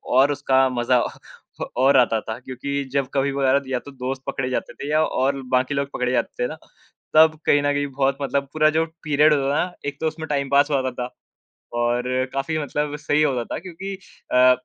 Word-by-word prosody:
और 135 +2 +5
उसका 135 -2 +3
मज़ा 125 +1 +3
अ - - -1 0.5
अ, - - 0
और 135 +2 +5
आता 115 -3 +4
था 110 +2 -6
क्योंकि 130 +2 -6 0.2
जब 140 -2 +1
कभी 140 0 +1
वगैरह 135 0 +1
या 125 - +1
तो 140 - -12
दोस्त 130 0 -4
पकड़े 130 -1 -2
जाते 130 - -3
थे 140 - -7
या 155 +1 +4
और 135 +1 0
बाकी 130 +3 +1
लोग 140 0 -2
पकड़े 125 0 -1
जाते 125 0 -1
थे - - +1
ना, 155 - -6 0.6
तब 155 0 +6
कहीं 145 - +4
न 145 0 +2
कहीं 145 0 0
बहुत 135 0 +1
मतलब 140 0 -1
पूरा 155 0 +4
जो 165 - +3 0.2
पीरियड 150 0 +4
होता 140 -1 +1
था 150 - +2
ना, 180 - -10
एक 145 -1 -4
तो 160 - +1
उसमें 160 0 -5
टाइम 140 -2 -1
पास 145 +1 +4
होता 130 -2 +1
था, 125 0 -5 0.6
और 120 +1 +1 0.3
काफ़ी 135 +4 -1
मतलब 150 0 -2
सही 150 0 +1
होता 130 -5 +1
था - - -4
क्योंकि 190 +3 -7 0.4
अ, 125 0 +7
140 Hz, 215 wpm, -23 LUFS, 130-150 Hz, 0.6 s, अ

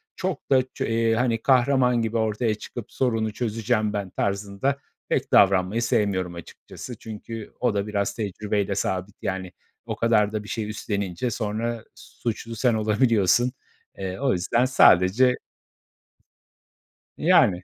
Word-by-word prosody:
çok 185 -5 -4
da 130 -1 +6
ço - - -3
eee, 115 0 +1
hani, 115 -1 0
kahraman 125 -2 +3
gibi 115 0 -1
ortaya 110 0 0
çıkıp 115 +2 -9
sorunu 115 -4 0
çözeceğim 110 -2 -1
ben 100 -2 -3
tarzında 100 +9 -1 0.3
pek - - -1
davranmayı 95 +3 +4
sevmiyorum 100 -7 0
açıkçası. 110 +7 -10
Çünkü 110 0 -8
o 125 -4 +1
da 100 +1 -1
biraz 100 -1 -1
tecrübeyle 105 -1 -2
sabit, 95 0 -2
yani, 95 -1 -3 0.3
o - - -4
kadar 105 -3 +2
da 105 -1 -3
bir 105 - -11
şey 105 -2 -3
üstlenince 100 +1 -3
sonra 110 +1 -3
suçlu 115 0 -6
sen 120 +1 +2
olabiliyorsun. 110 +1 +2 0.5
Eee, 95 +1 -5
o 135 -2 +2
yüzden 105 +8 +1
sadece 125 +1 +5 1.8
Yani. 90 -2 +4
110 Hz, 135 wpm, -24 LUFS, 100-120 Hz, 1.8 s, da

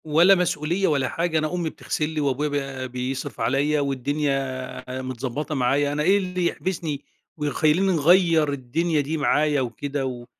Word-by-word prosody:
ولا 170 +5 +6
مسؤولية 175 +1 0
ولا 140 -4 +1
حاجة. 165 -1 -1
أنا 155 +2 -2
أمي 175 -2 -1
بتغسل 155 0 -3
لي 155 -1 -2
وأبويا 140 -1 -1
ب 125 - -8
بيصرف 130 +1 -4
عليّا 140 +6 +1
والدنيا 140 0 -1 0.4
ع 130 +1 -4
متضبّطة 130 +4 -4
معايا، 140 +2 +1
أنا 150 +1 0
إيه 195 +6 +4
اللي 180 -2 -2
يحبسني 165 -6 -3 0.3
ويخلّيني 155 +5 +2
نغيّر 165 -2 +4
الدنيا 150 +5 0
دي 145 +3 -2
معايا 150 -1 +2
وكده 135 +3 -3
و 125 -2 -5
150 Hz, 155 wpm, -24 LUFS, 135-160 Hz, 0.4 s, ولا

